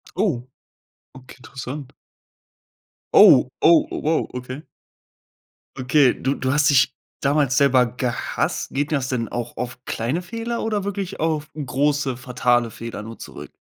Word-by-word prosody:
Oh, 120 +1 -1 0.7
okay, 130 0 -13
interessant. 135 +2 -7 1.3
Oh, - - +8
oh, 165 0 +5
oh, - - -3
wow, 160 +1 0
okay. 125 +3 -6 1.2
Okay, 130 +1 +3
du 135 +1 -2
du 130 +1 -1
hast 145 +1 +3
dich 130 -3 +4 0.3
damals 140 -1 +1
selber 130 -3 +4
gehasst. 125 0 -2
Geht 145 +2 -2
das 135 -4 -1
denn 115 -3 -1
auch 120 0 -5
auf 125 +1 -6
kleine 125 +10 -2
Fehler 230 +5 -4
oder 215 -3 -1
wirklich 200 -1 -4
auf 155 -1 -1
große 145 -1 0
fatale 125 -2 0
Fehler 115 0 -7
nur 115 +2 -9
zurück? - - -10
135 Hz, 135 wpm, -22 LUFS, 125-150 Hz, 1.3 s, Oh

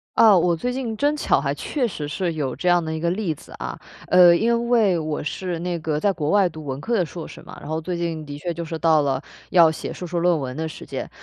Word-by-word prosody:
啊， 215 -4 +7
我 175 0 +3
最 245 +9 -2
近 245 -4 -3
真 290 +5 +2
巧 295 - +2
还 140 0 -1
确 250 - -2
实 160 -8 -5
是 170 +3 -2
有 140 -5 -2
这 160 - -4
样 175 -1 +4
的 160 0 -3
一 160 - -3
个 170 +1 0
例 180 -2 -1
子 - - -15
啊。 - - -6 0.3
呃， 180 -1 +7
因 235 +4 +1
为 215 -8 +3
我 155 -1 -3
是 175 +3 -3
那 175 0 -3
个 155 -1 -2
在 200 +4 +2
国 155 -5 -3
外 200 -1 +4
读 155 -2 -10
文 135 0 -4
科 235 - -2
的 185 -5 +2
硕 165 +1 -8
士 - - -11
嘛， - - -11
然 145 - -9
后 160 0 -1
最 175 +2 -4
近 165 -2 -3
的 145 0 -7
确 170 +4 -3
就 170 +1 -5
是 165 0 -4
到 160 -2 +4
了 140 -2 0 0.3
要 170 -3 +6
写 160 - -6
硕 180 - -7
士 175 +1 -3
论 170 0 +3
文 130 -1 -5
的 160 0 -2
时 160 - -9
间。 - - -5
170 Hz, 295 characters per minute, -23 LUFS, 155-185 Hz, 0.3 s, 啊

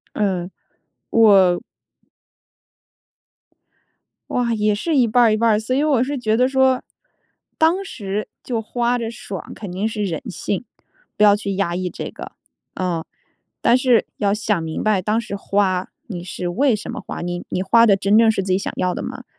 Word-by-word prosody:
嗯， 185 -4 -1 0.6
我 195 -6 +5 2.7
哇， 240 -2 0
也 210 -1 +1
是 305 +10 -1
一 250 -3 +4
半 245 +2 +4
儿 225 -2 +4
一 - - +1
半 230 +1 +2
儿。 210 - +3
所 220 +4 -2
以 280 - +2
我 280 -6 +3
是 280 +2 -3
觉 220 -3 0
得 250 +2 +3
说， 265 -1 +2 0.8
当 335 +5 +3
时 205 - -4 0.2
就 235 -3 -2
花 240 +2 0
着 230 -1 -4
爽， 195 -5 -8
肯 205 -4 -8
定 190 +4 -1
是 215 -1 -3
人 170 -6 -3
性， 200 +4 -3 0.5
不 210 - +2
要 205 -1 +7
去 200 -2 -3
压 185 -3 -1
抑 180 0 -2
这 - - -6
个。 - - -9 0.4
嗯， 175 -3 -2 0.6
但 240 - +4
是 250 -3 +3
要 200 -2 +1
想 210 -4 0
明 160 -1 -4
白 210 -3 +2
当 215 +4 +1
时 230 -3 -6
花， 195 -2 0 0.2
你 185 -8 -6
是 175 0 -5
为 255 +8 +2
什 210 - -7
么 - - -6
花， - - -7
你 175 0 -4
你 185 - -2
花 230 +4 +5
的 205 -4 +5
真 200 +1 +2
正 225 -1 +6
是 205 -3 0
自 185 0 -1
己 185 - +3
想 - - -4
要 180 -1 0
的 - - -4
吗？ - - -7
210 Hz, 200 characters per minute, -20 LUFS, 190-235 Hz, 2.7 s, 要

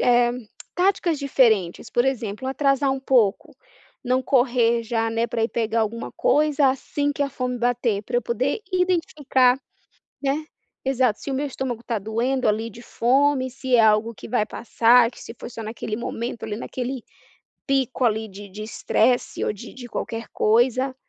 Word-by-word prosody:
eh, 240 -1 +4 0.4
táticas 360 -3 +1
diferentes, 230 -10 +2
por 240 - +2
exemplo, 255 -2 -2
atrasar 275 0 +2
um 270 - -3
pouco, 240 -7 +2 0.5
não 255 +1 +1
correr 240 -3 +2
já, 225 0 -1
né, 230 +1 0
pra 235 -1 -2
ir 225 - 0
pegar 230 0 0
alguma 225 +1 -3
coisa, 295 -2 +3
assim 285 +2 -2
que 285 - -1
a 280 - 0
fome 250 -2 -3
bater, 240 -3 0
pra 245 +3 -2
eu 245 - +1
poder 255 - -1
identificar, 300 -8 +2 0.7
né. 280 +3 0 0.4
Exato, 255 -5 +1
se - - -6
o - - -1
meu 290 +2 -1
estômago 245 -3 -4
tá 230 -3 -2
doendo 235 +5 -1
ali 220 +2 0
de 230 +2 -12
fome, 260 +2 +2
se 260 0 0
é - - +5
algo 220 +1 +3
que - - -10
vai 215 -4 +1
passar, 235 +1 +3
que - - -14
se 230 - -9
foi - - -7
só 230 - -8
naquele 220 -1 -4
momento 235 0 -5
ali, 220 -2 -3
naquele 250 0 -5 0.6
pico 265 -2 0
ali 220 -1 +1
de 200 +1 -10
de 210 +3 -8
estresse 245 +3 0
ou - - 0
de 210 - -11
de 250 -2 -9
qualquer 230 -1 -5
coisa, 255 +4 +2
245 Hz, 175 wpm, -23 LUFS, 225-265 Hz, 0.7 s, é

